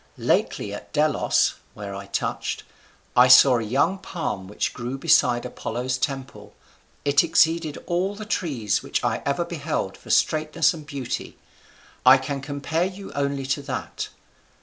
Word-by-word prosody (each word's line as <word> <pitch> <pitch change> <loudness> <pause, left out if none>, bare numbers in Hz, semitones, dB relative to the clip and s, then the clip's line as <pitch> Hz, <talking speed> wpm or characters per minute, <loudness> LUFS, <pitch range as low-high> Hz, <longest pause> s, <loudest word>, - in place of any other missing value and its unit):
Lately 100 - 0
at 105 - -9
Delos 150 0 +2 0.2
(where 100 -2 -7
I 100 0 -7
touched) 100 - -3 0.5
I 125 +1 +7
saw 125 0 +8
a - - -3
young 140 - +1
palm 165 - -4
which 105 - -2
grew 125 +2 -5
beside 125 -3 +3
Apollo's 125 0 -3
temple; 130 -8 -4 0.5
it 145 +2 +4
exceeded 160 -1 +2
all 185 +4 -1
the 215 +1 -7
trees 135 - -1
which - - -2
ever - - 0
I - - -11
beheld - - -3
for - - -16
straightness 155 +1 +2
and 155 -3 -10
beauty: 140 -5 -5 0.7
I 130 +1 +8
can 135 +1 -4
compare 145 +4 -1
you 195 +1 -7
only 140 -1 -1
to 135 +2 -1
that. 140 - -5
140 Hz, 150 wpm, -24 LUFS, 125-160 Hz, 0.7 s, saw